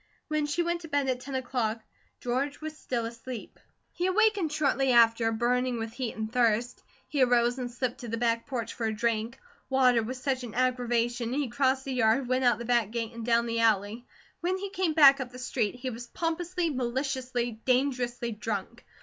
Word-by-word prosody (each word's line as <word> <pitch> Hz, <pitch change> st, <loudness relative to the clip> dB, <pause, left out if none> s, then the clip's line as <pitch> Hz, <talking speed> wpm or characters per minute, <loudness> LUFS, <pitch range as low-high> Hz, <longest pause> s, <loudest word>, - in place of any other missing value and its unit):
When 305 Hz, -1 st, 0 dB
she 320 Hz, +4 st, 0 dB
went 340 Hz, 0 st, -1 dB
to 325 Hz, -, -8 dB
bed 285 Hz, -2 st, 0 dB
at 255 Hz, -1 st, 0 dB
ten 270 Hz, +1 st, -7 dB
o'clock 245 Hz, -3 st, -1 dB, 0.4 s
George 260 Hz, +4 st, -1 dB
was 310 Hz, 0 st, -6 dB
still 240 Hz, -6 st, -3 dB
asleep. 230 Hz, 0 st, -8 dB, 0.3 s
He 355 Hz, +1 st, -1 dB
awakened 400 Hz, -4 st, +2 dB
shortly 275 Hz, -3 st, +1 dB
after, 230 Hz, -1 st, +5 dB
burning 245 Hz, +2 st, +1 dB
with 225 Hz, 0 st, -5 dB
heat 250 Hz, -2 st, -4 dB
and 220 Hz, 0 st, -4 dB
thirst. 240 Hz, -1 st, +1 dB, 0.3 s
He 290 Hz, -4 st, -1 dB
arose 245 Hz, 0 st, +3 dB
and 245 Hz, -1 st, -3 dB
slipped 245 Hz, +1 st, -3 dB
to 245 Hz, -, -7 dB
the 230 Hz, +1 st, -3 dB
back 230 Hz, +1 st, 0 dB
porch 235 Hz, -5 st, -3 dB
for 225 Hz, -, -2 dB
a 220 Hz, -, -1 dB
drink. 230 Hz, +2 st, -1 dB, 0.3 s
Water 255 Hz, -3 st, +4 dB
was 255 Hz, +4 st, -5 dB
such 260 Hz, -1 st, -1 dB
an 230 Hz, -3 st, -7 dB
aggravation, 240 Hz, -1 st, 0 dB
he 280 Hz, -2 st, -1 dB
crossed 265 Hz, +2 st, +1 dB
the 270 Hz, -, -3 dB
yard, 245 Hz, +1 st, +2 dB
went 255 Hz, +1 st, +1 dB
out 240 Hz, -3 st, +4 dB
the 235 Hz, -, -6 dB
back 235 Hz, -3 st, +2 dB
gate, 230 Hz, 0 st, -3 dB
and 230 Hz, 0 st, -7 dB
down 235 Hz, 0 st, +2 dB
the 230 Hz, 0 st, -1 dB
alley. 220 Hz, +1 st, +1 dB, 0.3 s
When 360 Hz, +2 st, 0 dB
he 395 Hz, 0 st, -5 dB
came 370 Hz, -4 st, 0 dB
back 280 Hz, -3 st, +8 dB
up 250 Hz, -2 st, -5 dB
the 250 Hz, -, -10 dB
street, 245 Hz, -4 st, -1 dB
he 255 Hz, +1 st, -4 dB
was 240 Hz, +1 st, -8 dB
pompously, 335 Hz, +3 st, -2 dB
maliciously, 250 Hz, -2 st, -2 dB
dangerously 250 Hz, -2 st, 0 dB
drunk. 220 Hz, +1 st, -4 dB
245 Hz, 200 wpm, -28 LUFS, 230-270 Hz, 0.4 s, back